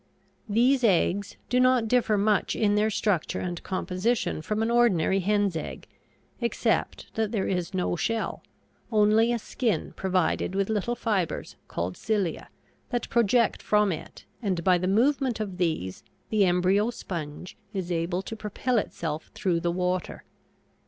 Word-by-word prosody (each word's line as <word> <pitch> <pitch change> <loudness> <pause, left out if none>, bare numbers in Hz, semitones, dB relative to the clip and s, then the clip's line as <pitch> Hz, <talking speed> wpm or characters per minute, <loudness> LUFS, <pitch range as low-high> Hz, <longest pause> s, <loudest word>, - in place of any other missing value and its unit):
These 250 +5 +3
eggs 200 -1 +2
do 250 - +2
not 255 -2 +4
differ 225 -3 +2
much 205 0 +2
in 205 -2 +2
their 210 +1 +3
structure 200 -5 0
and 175 -2 -4
composition 190 +1 -1
from 215 +6 -1
an 230 - 0
ordinary 195 -6 +3
hen's 200 -1 +1
egg, 160 - -6 0.5
except 235 -1 -1
that 220 -1 -1
there 210 -5 0
is 180 0 -2
no 180 -1 0
shell, 225 +6 -2 0.5
only 215 +2 +4
a 240 - +1
skin 230 0 -2
provided 185 0 0
with 195 +1 0
little 220 +3 0
fibers 210 -8 -2
called 90 +2 -3
cilia, 205 -6 -2 0.4
that 245 -2 -2
project 235 0 +2
from 210 -1 +3
it, 160 - -7 0.2
and 185 -6 -1
by 180 0 +4
the 180 - -1
movement 250 +4 +2
of 200 -4 -4
these 160 - -2 0.3
the 210 -3 +4
embryo 185 +4 +3
sponge 170 -6 -6 0.2
is 185 -4 -4
able 175 +2 -1
to 225 - -6
propel 220 +3 -1
itself 160 -5 -4
through 180 -4 +1
the 170 +1 -1
water. 180 0 -2
200 Hz, 150 wpm, -27 LUFS, 180-225 Hz, 0.5 s, not